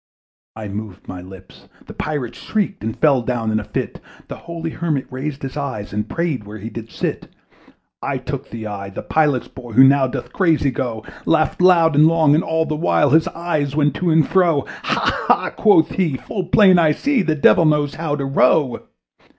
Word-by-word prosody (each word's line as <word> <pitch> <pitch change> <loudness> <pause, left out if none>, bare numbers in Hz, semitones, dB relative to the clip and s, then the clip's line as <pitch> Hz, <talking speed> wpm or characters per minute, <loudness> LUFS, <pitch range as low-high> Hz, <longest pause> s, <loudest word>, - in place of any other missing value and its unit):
I 110 -1 -7
moved 100 -1 -8
my 90 -1 -7
lips 95 +1 -14 0.2
the - - -10
Pilot 135 -6 -4
shrieked 200 - -3
And 110 0 -4
fell 140 -5 +3
down 115 -2 -2
in 110 - +1
a - - -6
fit; - - -5 0.3
The - - -6
holy 165 -1 -6
Hermit 155 -6 -2
raised 135 +2 -5
his 135 0 -5
eyes, 130 -9 -5
And 105 +1 -3
prayed 165 -9 -2
where 105 +1 -9
he 110 +3 -8
did 115 -1 -8
sit. - - -4 0.7
I 140 -1 -2
took 140 +1 -6
the 115 -1 -7
oars: 100 -2 -6
the - - -5
Pilot's 150 -5 +1
boy, 120 -3 -11
Who 130 - +7
now 135 0 +5
doth 125 - -6
crazy 160 -7 +2
go, 120 -4 -4 0.2
Laughed 160 +2 +1
loud 170 -3 +5
and 150 +2 +6
long, 160 -3 +3
and 155 - +2
all 160 0 0
the 155 - -3
while 150 -3 +2
His 160 +2 +4
eyes 155 -5 -2
went 145 -2 +2
to 180 - 0
and 160 -2 +3
fro. 170 -7 +2 0.2
"Ha! - - -1
ha!" - - +2
quoth 205 -7 +3
he, 165 -8 -1
"full 190 - -5
plain 185 0 +5
I 155 -3 +3
see, 280 - 0
The 160 -4 0
Devil 160 +3 +4
knows 150 -2 +1
how 155 -3 -3
to 140 -2 -3
row." 135 0 +2
145 Hz, 200 wpm, -19 LUFS, 120-165 Hz, 0.7 s, Who